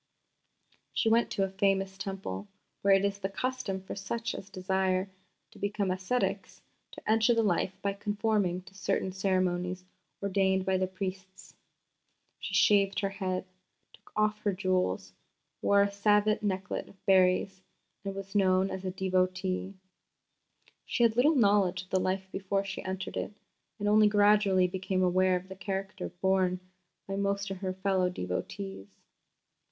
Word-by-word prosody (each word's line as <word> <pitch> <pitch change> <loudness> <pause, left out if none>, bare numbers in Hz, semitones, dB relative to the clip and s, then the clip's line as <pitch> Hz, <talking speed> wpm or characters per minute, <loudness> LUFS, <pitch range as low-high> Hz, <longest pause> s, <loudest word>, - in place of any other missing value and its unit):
She 225 - +2
went 230 +1 +3
to 195 - 0
a 190 - -1
famous 195 0 +1
Temple, 190 - -5 0.3
where 195 0 +5
it 195 +1 +2
is 200 0 -1
the 195 -1 -2
custom 210 -3 -2
for - - -6
such 225 +4 -3
as 195 - -8
desire 190 0 0 0.4
to - - -16
become 200 -1 -1
ascetics 185 +7 -2 0.3
to - - -11
enter 225 +2 +4
the 230 - +3
life 190 -1 0
by 200 0 +1
conforming 205 -3 0
to 190 - -16
certain 195 0 -1
ceremonies 185 -1 0 0.3
ordained 190 -1 +1
by 190 -1 +1
the 185 - +1
priests. 190 0 -7 0.9
She - - -4
shaved 200 -1 +4
her 195 - 0
head, 190 -2 -2 0.5
took - - -20
off 215 0 +1
her 205 -2 0
jewels, 180 - 0 0.5
wore 200 0 +5
a - - +2
Saivite 210 +1 +3
necklet 190 -3 -2
of 195 - -21
berries, 190 0 +3 0.4
and 195 -1 -4
was 195 0 -7
known 190 -1 +3
as 190 0 -5
a 185 - -2
devotee. 185 0 -1 1.1
She 240 - +1
had 225 -1 +4
little 290 +6 +4
knowledge 200 -6 +3
of 185 - -21
the 190 - +3
life 190 +1 -1
before 195 +1 -1
she 195 -1 -5
entered 190 0 -4
it, - - -3 0.4
and 205 -1 -2
only 210 0 +6
gradually 205 -2 +4
became 185 0 -1
aware 185 +1 +3
of 180 +1 -4
the 190 - -8
character 195 +1 -4
borne 185 0 +1 0.5
by 195 0 -3
most 200 0 -1
of 195 - -4
her 185 0 -3
fellow 190 -1 +1
devotees. 95 - -5
190 Hz, 155 wpm, -30 LUFS, 185-200 Hz, 1.1 s, only